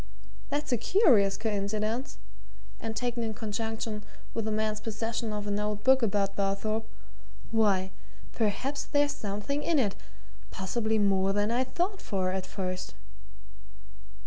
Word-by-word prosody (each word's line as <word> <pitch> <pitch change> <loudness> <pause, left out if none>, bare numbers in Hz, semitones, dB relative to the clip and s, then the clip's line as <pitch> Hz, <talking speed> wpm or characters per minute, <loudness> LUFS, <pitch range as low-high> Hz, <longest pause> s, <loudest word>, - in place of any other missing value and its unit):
That's 295 0 -1
a 245 - +4
curious 230 - +5
coincidence 215 +3 -1 0.6
and 225 -1 -4
taken 240 +1 -1
in 220 -1 -2
conjunction 220 0 -3 0.3
with 225 - -1
the 220 - 0
man's 215 0 0
possession 225 +1 -2
of 210 -1 -3
an 205 0 0
old 210 0 -2
book 265 0 +6
about 200 -3 +1
Barthorpe 210 +3 0 0.6
why, 200 -4 +3 0.4
perhaps 250 +6 0
there's 290 0 +2
something 210 +8 -2
in 325 +1 +2
it 210 -8 +2 0.5
possibly 220 +3 0
more 195 -2 +3
than 205 +2 +1
I 245 +2 +3
thought 360 +9 -1
for 185 -3 0
at 190 0 -2
first." 185 -2 -4
215 Hz, 135 wpm, -29 LUFS, 200-235 Hz, 0.6 s, book